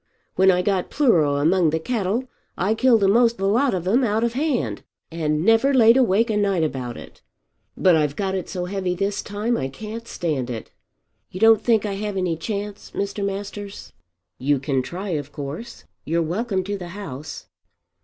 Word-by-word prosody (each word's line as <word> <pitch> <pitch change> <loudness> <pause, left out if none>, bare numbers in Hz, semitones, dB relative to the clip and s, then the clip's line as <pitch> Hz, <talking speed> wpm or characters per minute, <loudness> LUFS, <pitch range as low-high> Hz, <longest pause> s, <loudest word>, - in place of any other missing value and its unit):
When 190 0 +4
I 180 -1 +3
got 190 -2 0
pleuro 170 - +3
among 165 +3 +3
the 160 +1 0
cattle 220 +4 -1 0.3
I 195 +5 +1
killed 230 -2 +3
a'most 230 +4 +4
the 195 - -2
lot 235 +4 +2
of 180 -1 -4
'em 240 +7 +3
out 220 -1 +1
of 235 0 0
hand, 245 - -1 0.3
and 155 -1 -1
never 225 +5 +4
laid 230 -2 +7
awake 230 -2 +3
a 210 - 0
night 195 -5 +1
about 130 -6 -3
it. - - -12 0.6
But 185 -3 +5
I've 150 -2 +1
got 195 +1 -2
it 190 -2 -3
so 180 -2 -3
heavy 185 -1 -2
this 200 +2 -1
time 210 +4 -2
I 130 - -2
can't 220 - -8
stand 145 -8 -2
it. 115 -3 -6 0.6
You 185 - -8
don't 225 0 +6
think 220 -2 +2
I 205 - -2
have 205 0 -4
any 180 -3 0
chance, 205 +3 -5
Mr. 200 0 -2
Masters?" 200 0 -6 0.5
"You 140 +2 +2
can 135 0 -1
try 185 +9 -6
of 145 -4 -3
course. 150 +12 -7 0.2
You're 165 +2 0
welcome 190 +3 -1
to 200 +1 -4
the 175 - -7
house." 150 -6 -7
195 Hz, 185 wpm, -22 LUFS, 165-220 Hz, 0.6 s, laid